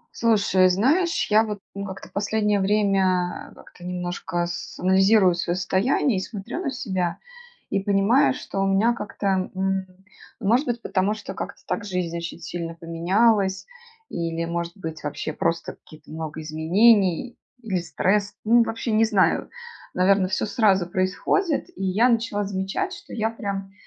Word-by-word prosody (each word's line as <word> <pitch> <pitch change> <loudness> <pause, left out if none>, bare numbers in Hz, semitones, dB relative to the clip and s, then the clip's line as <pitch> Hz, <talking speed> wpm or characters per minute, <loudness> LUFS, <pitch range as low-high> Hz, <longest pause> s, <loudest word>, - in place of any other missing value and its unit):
Слушай, 200 -5 +3
знаешь, 295 - +2
я 215 +1 +6
вот, 210 -2 -4 0.2
ну, 200 0 -5
как-то 190 -1 -8
в - - -35
последнее 210 0 +1
время, 190 -3 +1
а, - - -17
как-то 175 - -16
немножко 175 -1 -3
с 170 0 -6
анализирую 190 +1 +4
свое 170 0 -1
состояние 195 +6 +1
и - - -1
смотрю 210 - -6
на 355 - -1
себя 190 -10 -2 0.5
и 200 - +2
понимаю, 205 +8 +3
что 195 - -5
у 195 - +2
меня 205 +5 +3
как-то, 195 -3 -2
м, 190 0 -1 0.5
может 240 +6 +2
быть, 240 -1 -2
потому 195 +2 0
что 215 - -7
как-то - - -7
так 230 - -2
жизнь 180 -4 -3
очень 170 0 -5
сильно 170 0 -5
поменялась 190 +4 +1 0.4
или, 165 -1 -3
может 170 +2 -4
быть, 160 -4 -7
вообще 150 +1 -4
просто 165 +2 -1
какие-то 155 -1 -17
много 160 0 -6
изменений 185 +7 +3 0.3
или 195 -5 -1
стресс. 200 +3 0
Ну, 235 +2 +5
вообще, 230 +1 -3
не 220 +1 +4
знаю, 205 -4 +2 0.5
наверно, 190 +1 +3
всё 190 - -1
сразу 205 -5 +2
происходит. 190 - 0
И - - -5
я 200 +6 +3
начала 230 -3 +1
замечать, 195 - -3
что - - -11
я 225 -1 0
прям 200 -3 -5
195 Hz, 155 wpm, -24 LUFS, 180-220 Hz, 0.5 s, я